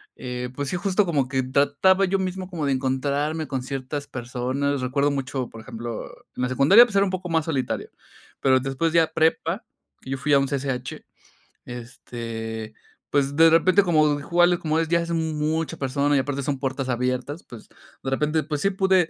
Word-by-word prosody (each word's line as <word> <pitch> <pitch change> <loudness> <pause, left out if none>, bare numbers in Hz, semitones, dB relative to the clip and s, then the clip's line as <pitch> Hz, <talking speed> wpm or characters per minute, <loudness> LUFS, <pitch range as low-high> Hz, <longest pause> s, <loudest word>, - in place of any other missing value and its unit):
eh, 125 0 -5
pues 145 -1 -3
sí, - - -2
justo 195 +2 +1
como 145 -6 0
que 130 0 0
trataba 145 +9 +3
yo 195 +1 0
mismo 185 0 -3
como 165 -5 -3
de 140 - +2
encontrarme 140 +4 -1
con 130 -2 -3
ciertas 135 +2 -5
personas. 130 +3 -2
Recuerdo 140 +3 +1
mucho, 135 -2 -3
por 115 - -11
ejemplo, 115 -1 -6 0.3
en - - -2
la 125 - 0
secundaria, 145 - +7
pues 215 -4 -8
era 200 0 +5
un 190 - -2
poco 185 -1 -4
más 160 -2 +1
solitario, 140 -6 -2 0.5
pero 130 -1 +4
después 135 +5 -1
ya 165 -1 +4
prepa, 165 +5 +1 0.4
que 130 - -8
yo 135 - -1
fui 145 +2 0
a 140 - +7
un 135 - 0
CCH, 130 -2 -3 0.6
este, 115 -2 -7 0.4
pues 140 0 +1
de 165 +2 +7
repente 180 +5 +5
como 155 -4 +3
igual, 175 +3 +3
como 155 0 0
es, 165 - 0
ya 170 +1 +2
es 170 0 -4
mu 160 -1 -1
mucha 155 +1 -1
persona 140 +2 +1
y - - +4
aparte 140 +1 -2
son 140 0 -2
puertas 130 -1 -2
abiertas, 125 +5 -2
pues 115 -3 -12 0.4
de 135 - -2
repente, 150 +3 +1
pues 150 -1 -3
sí 195 - +3
pude, 190 -3 +2
145 Hz, 195 wpm, -24 LUFS, 130-165 Hz, 0.6 s, secundaria